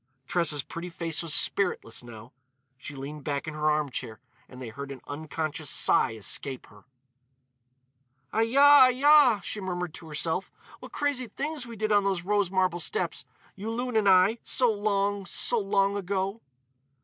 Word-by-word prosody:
Tressa's 155 -3 0
pretty 175 +1 -7
face 165 -2 -3
was 165 -2 -4
spiritless, 145 - +1
now; 115 +1 -12 0.4
she 140 +3 -9
leaned 140 +2 -8
back 140 0 -3
in 155 - -4
her 155 0 0
armchair 135 -7 -2 0.3
and 125 - -12
they 125 -3 -7
heard 140 +5 -8
an 135 -1 -8
unconscious 155 0 -5
sigh 110 - +2
escape 130 +5 -3
her. 105 -1 -19 1.5
"Ai 220 - +2
ya! 280 +4 +7
Ai - - +5
ya!" 265 -4 +5
she 210 +3 -5
murmured 180 -3 -4
to 165 - -10
herself, 160 +4 -2 0.3
"what - - -11
crazy 285 -4 -1
things 285 +3 -4
we 230 - -9
did 215 0 -2
on 205 -1 +4
the 195 -2 0
rose 205 -2 +1
marble 185 -2 0
steps, 440 - -3 0.3
Yulun 230 +4 -4
and 210 -2 +3
I, 190 +5 +4
so 245 -3 +2
long—so 205 +1 0
long 200 0 +1
ago." 195 +2 -3
185 Hz, 160 wpm, -27 LUFS, 150-215 Hz, 1.5 s, ya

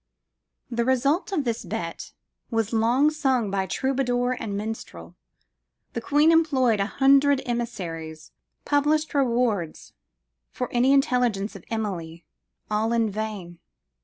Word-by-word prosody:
"The 235 0 0
result 275 - +1
of 335 -7 0
this 235 -3 -2
bet - - -5 0.4
was 225 -1 -1
long 240 +7 +3
sung 265 -8 0
by 195 -1 -1
troubadour 245 +2 0
and 205 -3 -4
minstrel. 205 - -7 0.8
The 235 - -3
Queen 295 +6 +4
employed 265 -9 +3
a 200 - +1
hundred 275 +2 +4
emissaries 170 -10 -5 0.3
published 300 +2 +1
rewards 235 - 0 0.6
for 250 - -5
any 250 +2 +3
intelligence 245 -7 +1
of 195 - -10
Emilie 175 -7 -4 0.5
all 220 +2 +1
in 225 -2 +1
vain. 200 -5 -5
235 Hz, 120 wpm, -25 LUFS, 205-270 Hz, 0.8 s, Queen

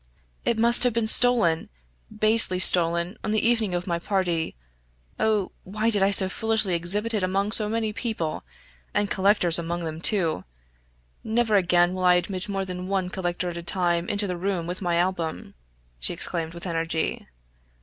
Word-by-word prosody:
"It 235 - 0
must 235 +2 +3
have 245 -2 +5
been 230 -1 0
stolen 225 -8 +2 0.4
basely 215 -3 +5
stolen 170 +1 +3
on - - -4
the 215 +1 +1
evening 225 -6 0
of 175 0 -3
my 170 -2 -2
party. 175 -3 -2 0.6
Oh! 215 -4 0
why 215 +4 -2
did 205 -3 0
I 195 - +3
so 195 -1 +4
foolishly 220 -1 -1
exhibit 200 +7 0
it 210 - -1
among 195 +3 -1
so 215 -1 +6
many 220 -1 -2
people, 220 -9 -4 0.5
and 205 -1 0
collectors 190 -4 +3
among 170 +1 -4
them, 160 0 -6
too! 170 - +1 0.8
Never 225 -1 0
again 175 -2 +2
will 185 0 -3
I 180 0 +5
admit 185 +2 -3
more 195 -1 -3
than 180 0 -6
one 190 -2 -2
collector 180 -1 -3
at 170 - -7
a - - -5
time 175 -1 -2
into 205 0 -1
the 180 -2 -4
room 185 -2 -3
with 180 +3 -6
my 175 -2 -1
album!" 170 -2 -3 0.5
she - - +1
exclaimed 165 -1 -5
with 170 - -7
energy. 165 -2 -3
185 Hz, 175 wpm, -24 LUFS, 175-215 Hz, 0.8 s, so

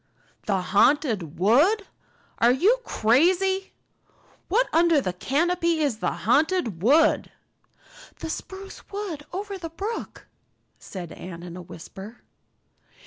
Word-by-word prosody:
"The 195 -3 +1
Haunted 200 - +2
Wood! 295 - +4 0.5
Are 235 +1 +5
you 395 - +3
crazy? 370 - +2 0.7
What - - +2
under 335 -2 +4
the 185 -9 -2
canopy 335 - 0
is 280 -8 0
the - - 0 0.2
Haunted 270 - +2
Wood?" 285 - +3 0.9
"The 320 - -5
spruce 390 +3 -8
wood 380 -8 -5
over 395 +1 -5
the 330 -2 -6
brook," 405 +8 -6 0.5
said 180 -4 -8
Anne 170 -1 -9
in 175 -1 -8
a 180 - -7
whisper. 190 +6 -11
295 Hz, 115 wpm, -25 LUFS, -, 0.9 s, Are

